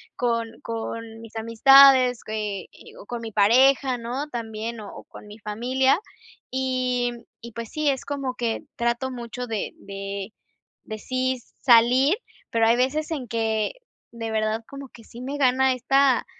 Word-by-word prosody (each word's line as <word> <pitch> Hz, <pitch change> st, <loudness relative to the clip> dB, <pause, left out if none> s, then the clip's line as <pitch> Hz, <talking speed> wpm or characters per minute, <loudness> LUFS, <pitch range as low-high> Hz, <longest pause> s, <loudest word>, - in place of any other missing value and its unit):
con 230 Hz, -2 st, -2 dB
con 225 Hz, 0 st, -6 dB
mis 225 Hz, 0 st, -13 dB
amistades, 255 Hz, +2 st, +6 dB
eh 210 Hz, -3 st, -3 dB
eh -, -, -16 dB
o -, -, -12 dB
con 240 Hz, +2 st, -5 dB
mi 225 Hz, -1 st, -6 dB
pareja, 255 Hz, +5 st, +4 dB
¿no?, 250 Hz, +5 st, -4 dB
también 225 Hz, -2 st, -5 dB
o 205 Hz, -2 st, -8 dB
o -, -, -10 dB
con -, -, -14 dB
mi 210 Hz, +1 st, -11 dB
familia, 250 Hz, -, +1 dB, 0.5 s
y 255 Hz, -1 st, 0 dB, 0.3 s
y 235 Hz, -, -9 dB
pues 230 Hz, 0 st, -7 dB
sí, 305 Hz, -1 st, 0 dB
es 270 Hz, -2 st, -1 dB
como 275 Hz, -3 st, -3 dB
que 235 Hz, -2 st, -2 dB
trato 235 Hz, +2 st, -1 dB
mucho 250 Hz, 0 st, -6 dB
de 220 Hz, -3 st, -3 dB
de 195 Hz, +1 st, -7 dB, 0.5 s
-de 215 Hz, -, -6 dB
sí 255 Hz, +3 st, -2 dB, 0.2 s
salir, 255 Hz, -, +5 dB, 0.3 s
pero 225 Hz, -1 st, +2 dB
hay 230 Hz, +1 st, +4 dB
veces 295 Hz, +6 st, 0 dB
en 275 Hz, -6 st, -3 dB
que 220 Hz, -2 st, -1 dB, 0.4 s
de 230 Hz, -1 st, -5 dB
verdad, 220 Hz, +1 st, -1 dB
como 275 Hz, -1 st, -9 dB
que 230 Hz, -, -16 dB
sí 235 Hz, +2 st, -12 dB
me 275 Hz, +3 st, -4 dB
gana 265 Hz, -1 st, +3 dB
esta 265 Hz, +1 st, +2 dB
235 Hz, 160 wpm, -24 LUFS, 225-260 Hz, 0.5 s, amistades